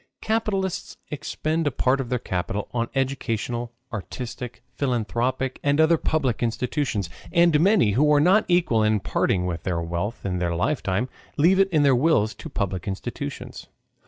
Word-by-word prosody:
Capitalists 205 -4 -1
expend 155 +2 -2
a - - +2
part 130 +3 +1
of 125 - -6
their 125 - +1
capital 100 -1 -3
on 115 -1 -1
educational, 120 -3 -2 0.2
artistic, 120 +3 -6
philanthropic, 125 0 -1
and 145 +1 +2
other 160 0 +5
public 135 -7 0
institutions. 120 - -1 0.2
And 170 -3 +4
many, 185 - +4
who 150 +8 +3
are 145 - +5
not 185 +8 +4
equal 170 -11 +3
to 110 0 +3
parting 90 -1 0
with 85 -2 -3
their 90 -2 -1
wealth 85 +8 -3
in 90 -2 -1
their 85 -1 0
lifetime, 105 - 0 0.3
leave 175 +6 +4
it 195 0 +4
in 155 -5 +3
their 140 -2 +5
wills 125 -6 +3
to 160 - -9
public 100 - -3
institutions. 95 -1 -5
125 Hz, 160 wpm, -24 LUFS, 105-155 Hz, 0.3 s, other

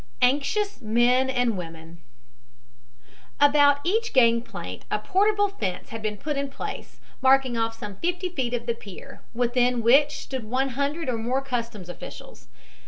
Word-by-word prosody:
ANXIOUS 290 - +1
MEN 240 +4 +3
AND 245 -3 +1
WOMEN 165 -1 -9 1.4
About 285 0 +5
each 445 +6 0
gangplank 230 - +1
a - - +1
portable 410 - +2
fence 195 - -4
had 225 0 -6
been 215 -1 -3
put 295 +6 -3
in 280 0 -2
place, 275 - -7 0.2
marking 265 -1 +4
off 225 0 -1
some 205 -2 -7
fifty 355 - -1
feet 255 -8 -2
of 235 -1 -5
the 235 - 0
pier, 210 -5 -11
within 245 0 +1
which 280 +6 +5
stood 260 -3 -5
one 260 +5 0
hundred 280 +5 -2
or 240 -3 -1
more 255 +4 -1
customs 235 -7 -4
officials. 340 - -10
250 Hz, 150 wpm, -25 LUFS, 225-285 Hz, 1.4 s, About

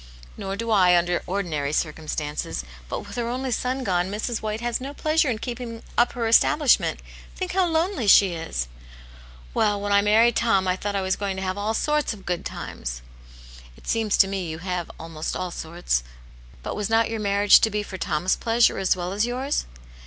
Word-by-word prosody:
"Nor 195 0 -4
do 230 +2 -3
I, 180 -4 +5
under 175 0 +1
ordinary 165 -7 -2
circumstances. 155 -1 -3 0.3
But - - -3
with 205 +2 -10
her 235 -1 -1
only 255 +2 -2
son 255 +3 -1
gone, 180 -3 0
Mrs. 220 +3 -3
White 215 0 -3
has 240 +1 -2
no 275 +2 -6
pleasure 310 -2 +2
in 230 - 0
keeping 235 -1 -6
up 240 - +3
her 235 -2 -2
establishment. 260 +4 +4 0.3
Think 370 -1 -3
how 375 -1 +2
lonely 325 - 0
she 195 -2 +7
is! 65 - -3 0.4
" - - -20
"Well, 205 -1 +2
when 205 0 -3
I 200 0 +5
married 220 +3 +4
Tom, 195 -5 +2
I 180 - +2
thought 200 +2 -4
I 195 - 0
was 190 0 +1
going 200 -2 -3
to 190 - -4
have 185 0 -2
all 210 +2 -1
sorts 300 -4 0
of 195 - -16
good 175 -1 -2
times." - - -6 0.4
" - - -18
It - - -17
seems 225 -2 +1
to 195 - +6
me 190 -3 -3
you 160 - -5
have 180 0 -4
almost 165 -1 -5
all 185 -1 -3
sorts. 165 - -2 0.6
But - - -4
was 210 0 -2
not 225 0 +2
your 225 - -2
marriage 205 0 +5
to 220 - +3
be 210 0 -2
for 190 -2 -8
Tom's 165 +3 0
pleasure, 230 -1 +2
as 190 -1 +2
well 180 0 -4
as 210 +4 +1
yours 260 +4 -2
200 Hz, 205 wpm, -24 LUFS, 175-230 Hz, 0.6 s, she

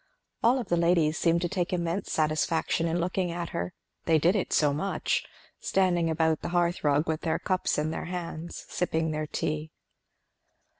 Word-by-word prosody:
All 240 +3 +4
of 240 -6 -4
the 175 - +2
ladies 170 -2 +3
seemed 170 +1 +2
to - - +2
take 180 -1 -2
immense 175 +2 -2
satisfaction 160 +2 +1
in 165 +1 0
looking 180 +1 0
at 170 0 -4
her, 170 +1 -3 0.3
they 165 -1 +4
did 170 +6 +3
it 200 - -1
so 145 -2 +3
much; 195 +7 -1 0.4
standing 175 -3 +2
about 160 -1 +1
the - - -4
hearth 175 0 +1
rug 145 +2 +2
with 160 0 -1
their 160 - 0
cups 185 -2 0
in 155 +1 0
their - - -4
hands, 170 -1 -6
sipping 160 -2 -1
their 155 0 -2
tea. 155 +1 -2
170 Hz, 180 wpm, -28 LUFS, 160-180 Hz, 0.4 s, All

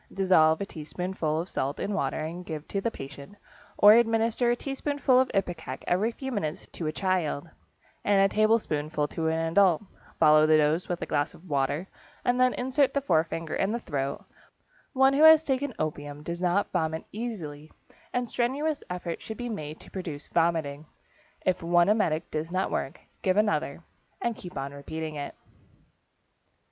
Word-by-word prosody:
Dissolve 160 -5 +4
a - - -1
teaspoonful 160 -1 -3
of 170 - -3
salt 140 -4 -3
in 205 - -2
water 195 - -1
and 165 +3 -5
give 155 -3 -6
to 200 - -1
the 230 - 0
patient, 140 0 -10 0.4
or 205 +1 +9
administer 230 +1 +3
a 240 - +3
teaspoonful 275 0 +1
of 260 - +3
ipecac 175 -9 -3
every 205 +6 +1
few 265 +3 -6
minutes 165 -8 -3
to 165 - -4
a - - 0
child, 175 -5 -1 0.6
and 200 -1 +3
a 195 0 +3
tablespoonful 155 -9 +1
to 160 -1 -2
an 160 0 +1
adult. 190 -1 +4 0.4
Follow 155 0 +6
the 155 0 +6
dose 155 +4 +1
with 175 -1 -2
a - - -2
glass 145 -1 -1
of 180 - -16
water 145 +4 0 0.4
and 245 0 +2
then 255 0 +4
insert 265 +3 +1
the 280 - +2
forefinger 165 - 0
in 195 - 0
the 235 - -1
throat. 140 - -3 0.7
One 265 0 +5
who 280 - +2
has 315 0 +9
taken 275 -1 -1
opium 145 -1 -4
does 170 +2 -5
not 185 +3 +1
vomit 160 -2 -1
easily 165 -10 -6 0.4
and 245 -1 -1
strenuous 280 +5 -1
efforts 180 -1 -4
should 220 - -7
be 245 0 -4
made 155 -8 -6
to - - -15
produce 160 -6 -6
vomiting. 160 -3 0 0.6
If 185 -1 +1
one 175 +2 +3
emetic 170 -7 +1
does 155 +2 -3
not 185 +1 0
work, 135 - -3 0.2
give 185 +1 +1
another, 170 -7 0 0.4
and 235 -1 -1
keep 180 -6 -9
on 135 +1 -4
repeating 155 +2 -5
it. 145 -1 -6
175 Hz, 175 wpm, -27 LUFS, 155-220 Hz, 0.7 s, or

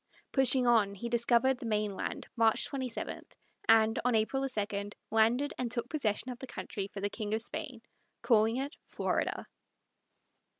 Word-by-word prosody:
Pushing 260 -1 +5
on, 220 -4 +3
he 235 +5 -5
discovered 240 +2 +2
the 245 - -7
mainland 210 -3 -2
March 225 -2 +4
27, 260 -4 -4 0.5
and, 225 0 +5
on 250 -1 +2
April 270 +5 0
2, 205 -3 -3 0.2
landed 235 +6 +2
and 250 -2 -1
took 235 0 -2
possession 250 -5 -1
of 245 - -8
the 265 - -7
country 200 -5 -5
for 200 0 -8
the 205 - +1
King 215 -1 -2
of 220 - -2
Spain, 275 -5 -6 0.4
calling 225 0 +3
it 275 +2 -3
Florida. - - -2
230 Hz, 155 wpm, -31 LUFS, 215-255 Hz, 0.5 s, Pushing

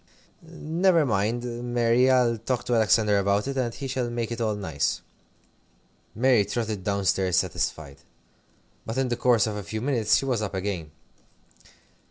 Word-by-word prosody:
"Never 165 0 +1
mind, 120 +2 -2
Mary, 120 +2 +3
I'll 125 -3 +3
talk 125 +2 -2
to 125 - -1
Alexander 110 -2 +3
about 100 +3 +1
it, 135 - -3
and 125 -3 -1
he 140 - -7
shall 125 -2 -2
make 120 -1 -3
it 115 0 -4
all 110 -2 0
nice." 80 -8 -2 1.2
Mary 125 -2 +4
trotted 105 -1 -3
down 100 0 -1
stairs 95 -1 +1
satisfied. 80 -6 -2 0.9
But 115 +3 -5
in 130 -1 0
the 120 - 0
course 120 -3 +3
of 105 -2 -3
a - - -4
few 110 +3 -5
minutes 120 -4 +2
she - - -2
was 125 -5 0
up 100 -2 -4
again. 95 -5 -3
115 Hz, 165 wpm, -25 LUFS, 100-125 Hz, 1.2 s, Mary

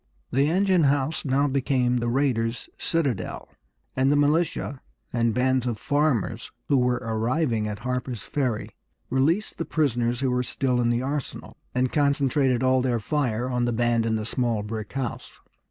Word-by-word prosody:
The 140 +3 +3
engine 185 -1 +3
house 140 +3 +1
now 140 +1 +2
became 130 -2 +1
the 120 0 -1
raiders' 120 -3 0
citadel, 140 - -2 0.5
and 130 +1 +3
the - - +4
militia 145 -1 +1 0.3
and 115 -1 +2
bands 125 +1 +1
of 120 -3 -1
farmers 125 -4 0 0.2
who 140 - +4
were 125 -1 +2
arriving 115 +1 0
at 105 -1 -4
Harper's 125 -1 -3
Ferry 125 -7 -2 0.4
released 160 +12 +1
the - - 0
prisoners 120 -5 0
who 130 -2 +1
were 125 0 +1
still 125 0 0
in 120 - +2
the 120 +1 +1
arsenal, 140 0 -4 0.2
and 125 0 +1
concentrated 140 -3 +2
all 130 0 +3
their 125 -2 0
fire 125 -1 -1
on 125 -1 0
the 120 - 0
band 115 0 +1
in 110 - +1
the 110 -1 -2
small 115 -3 -1
brick 110 0 -5
house. 130 -2 -4
125 Hz, 165 wpm, -25 LUFS, 120-140 Hz, 0.5 s, the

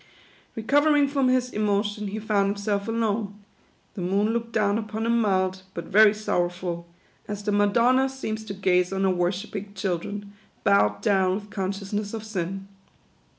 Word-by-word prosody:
Recovering 290 +5 +3
from 275 -2 +1
his 255 0 +2
emotion, 205 0 0
he 200 +2 -4
found 210 -2 +1
himself 200 0 -1
alone. 220 -2 -1 0.6
The 190 - -6
moon 195 +4 +1
looked 230 0 -3
down 210 -1 +1
upon 220 0 -4
him 235 0 +2
mild, 190 -2 +1
but 170 - -5
very 215 +1 +6
sorrowful; 175 -4 -2 0.4
as 205 0 -5
the 210 - 0
Madonna 235 +6 +3
seems 220 -5 -5
to 200 - -6
gaze 180 -2 +2
on 195 0 -1
her 190 - +3
worshipping 190 +3 -2
children, 200 +2 -3 0.3
bowed 105 - +3
down 190 -2 +3
with 205 +1 -7
conscious 195 0 -4
ness 205 +1 -2
of 220 - -6
sin. 195 -2 -4
205 Hz, 155 wpm, -25 LUFS, 190-220 Hz, 0.6 s, very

